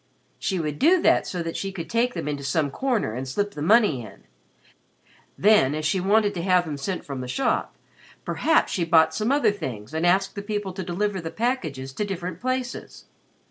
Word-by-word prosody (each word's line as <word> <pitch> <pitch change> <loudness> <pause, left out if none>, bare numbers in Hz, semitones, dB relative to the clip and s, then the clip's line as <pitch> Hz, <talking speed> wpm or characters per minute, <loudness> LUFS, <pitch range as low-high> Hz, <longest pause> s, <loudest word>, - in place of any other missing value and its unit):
She 190 -3 -1
would 150 -2 -3
do 350 +6 +5
that - - +4
so 175 -2 -3
that 165 0 -5
she 195 - -3
could 170 -4 -6
take 240 +6 0
them - - -4
into 145 -1 -3
some 140 +1 0
corner 240 - -1
and 130 +3 -5
slip 205 +10 -1
the 150 - -8
money 205 - +4
in. 105 -4 -12 1.1
Then, 195 -9 +4
as 155 0 -3
she 185 +5 +1
wanted 205 +2 +2
to 175 - -4
have 180 0 +3
them 150 -3 -4
sent 180 +7 -4
from 135 -2 -5
the 125 - -6
shop, 265 - -1 0.5
perhaps 320 - +2
she 180 - 0
bought 165 -1 +4
some 215 +4 0
other 285 -5 +3
things 130 - -6
and 160 +1 -1
asked 190 +2 +2
the 200 - -5
people 205 -2 -3
to 190 - -5
deliver 190 +2 -2
the 165 - -5
packages 160 - -2
to 210 - -2
different 180 -3 -5
places. 255 0 -4
180 Hz, 205 wpm, -24 LUFS, 150-210 Hz, 1.1 s, do